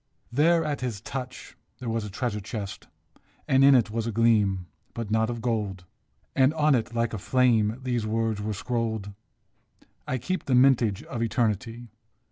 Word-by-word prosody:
There 165 +6 +3
at 145 -3 -2
his 120 -5 -3
touch 125 +3 -7 0.2
there 125 - -7
was 115 -1 -1
a 105 - -6
treasure 105 +1 -2
chest. 100 -1 -6 0.6
And 135 0 +4
in 140 0 +8
it 115 -4 +2
was 115 0 -2
a - - -1
gleam, 105 -5 +2 0.3
but 115 -3 -5
not 110 +1 +2
of 120 -2 -5
gold; 105 -6 -2 0.5
And 135 +4 +4
on 155 -1 +3
it, 115 -2 -1
like 115 -1 0
a 110 - -3
flame, 115 0 +2
these 120 -3 -1
words 110 -1 -1
were 105 +1 -2
scrolled: 110 -2 -2 0.5
" - - -34
I 130 - -1
keep 175 +8 -3
the 130 - +2
mintage 125 -6 +4
of 120 -4 -5
Eternity. 115 +1 -1
115 Hz, 175 wpm, -26 LUFS, 110-125 Hz, 0.6 s, in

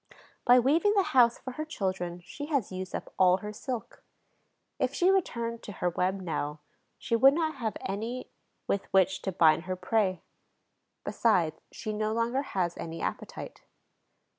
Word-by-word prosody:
By 245 0 +7
weaving 325 - +3
the 395 - +4
house 240 -2 +6
for 260 - -7
her 305 +5 -4
children 185 - -3
she 290 +10 -7
has 280 -11 0
used 185 0 -5
up - - -6
all 185 -1 +6
her 210 +2 -7
silk. 245 +2 -6 0.8
If - - 0
she 365 +1 +4
returned 235 -11 -1
to 205 - -8
her 180 -1 -1
web 185 +3 0
now, 150 -4 -3 0.4
she 230 - -1
would 270 +4 +6
not 315 -3 -1
have 225 -4 -2
any 225 +6 -4 0.3
with 200 - -2
which 190 0 +3
to 190 - -2
bind 165 -1 +4
her 185 0 -2
prey. 185 -2 0 0.8
Besides, 175 -9 +1
she 215 - -5
no 215 +1 -1
longer 235 +4 +1
has 180 -10 -2
any 165 0 -5
appetite. - - -5
215 Hz, 165 wpm, -29 LUFS, 185-255 Hz, 0.8 s, By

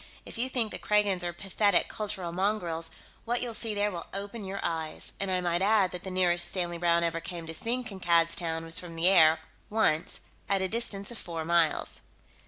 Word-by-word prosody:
If - - -9
you 255 +2 +1
think 235 -5 +1
the - - -5
Kragans 205 -3 +2
are 175 - -2
'pathetic 195 +2 +1
cultural 200 -5 -3
mongrels,' 175 -3 -1 0.3
what 240 +1 0
you'll 240 -2 -3
see 220 -1 0
there 205 0 +1
will 170 -3 -6
open 205 +3 -5
your 195 +1 -5
eyes. 160 -2 -2
And 195 - -2
I 185 -1 +1
might 175 0 0
add 200 -2 +3
that 180 - -5
the 190 - -5
nearest 180 -2 +2
Stanley 175 -2 -2
Browne 170 0 +2
ever 165 0 -1
came 170 0 -6
to 160 - -5
seeing 240 +9 -2
Kankad's 170 -6 +2
Town 165 -2 -3
was 165 0 0
from 170 -2 -9
the 165 +2 +4
air, 160 -4 +6 0.3
once, 210 -7 +1 0.3
at 200 -1 +2
a - - +1
distance 200 -1 -2
of 235 - -7
four 165 -2 -5
miles." 170 -1 +3
185 Hz, 205 wpm, -28 LUFS, 170-205 Hz, 0.3 s, air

